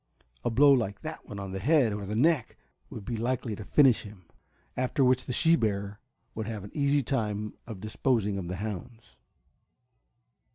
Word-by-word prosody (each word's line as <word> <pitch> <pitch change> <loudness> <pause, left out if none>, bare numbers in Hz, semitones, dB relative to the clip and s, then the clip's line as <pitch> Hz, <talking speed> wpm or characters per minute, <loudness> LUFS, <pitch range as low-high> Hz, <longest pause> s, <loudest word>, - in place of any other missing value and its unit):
A - - +1
blow 140 +5 +6
like 105 -6 0
that 155 0 -7
one 100 -2 -6
the 95 - -4
head 130 -1 +3
or 100 -1 -5
the 105 - -3
neck 140 +1 +2 0.3
would 105 - -8
be 120 - -3
likely 120 -1 -1
to 110 - -8
finish 130 +1 +4
him, 100 -4 -12 0.5
after 130 +2 +1
which 125 0 +3
the - - -4
she 165 +6 +4
bear 100 -5 -2 0.3
would 110 -1 -4
have 110 -4 -5
an 100 - -10
easy 140 -1 +2
time 105 -5 -2
of 110 -5 -8
disposing 110 -2 0
of 90 - -5
the 90 - -3
hounds. 110 +4 -7
110 Hz, 175 wpm, -28 LUFS, 100-130 Hz, 0.5 s, blow